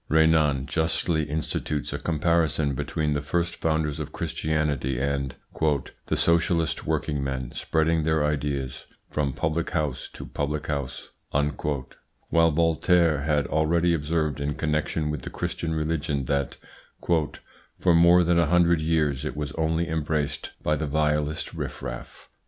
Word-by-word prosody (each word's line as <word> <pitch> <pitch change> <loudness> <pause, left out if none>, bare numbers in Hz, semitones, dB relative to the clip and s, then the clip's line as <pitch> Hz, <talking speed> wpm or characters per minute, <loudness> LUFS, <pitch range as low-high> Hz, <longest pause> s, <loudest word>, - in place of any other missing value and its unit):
Renan 80 -3 +4
justly 80 0 0
institutes 75 -1 -2
a - - -3
comparison 80 -2 +1
between 75 +3 -1
the 70 - -1
first 85 +4 -1
founders 80 -2 0
of - - -5
Christianity 75 -5 -1
and 70 -2 -1 0.7
"the - - 0
socialist 85 -1 +2
working 70 -2 0
men 65 -2 -3
spreading 80 0 +1
their 80 -1 +2
ideas 70 -3 -2 0.2
from 75 -2 0
public 80 +4 -1
house 75 -7 -2
to - - -8
public 75 +1 -3
house"; 70 -4 -4 1.2
while 80 0 +5
Voltaire 80 -1 +3
had 75 -2 +2
already 80 +4 +2
observed 75 -2 0
in 70 0 -1
connection 75 0 -1
with 75 - -4
the - - -6
Christian 80 -1 -3
religion 75 -3 -1
that 70 0 -1 1.2
"for 90 - +4
more 85 +2 +6
than 85 0 +3
a 85 - +3
hundred 85 0 +4
years 75 -4 +1
it - - -4
was 75 -2 -3
only 80 +3 0
embraced 80 -2 -2
by 75 - +2
the 75 +1 -2
vilest 75 +1 0
riff 70 -5 -5
raff." - - -7
75 Hz, 140 wpm, -26 LUFS, 70-80 Hz, 1.2 s, more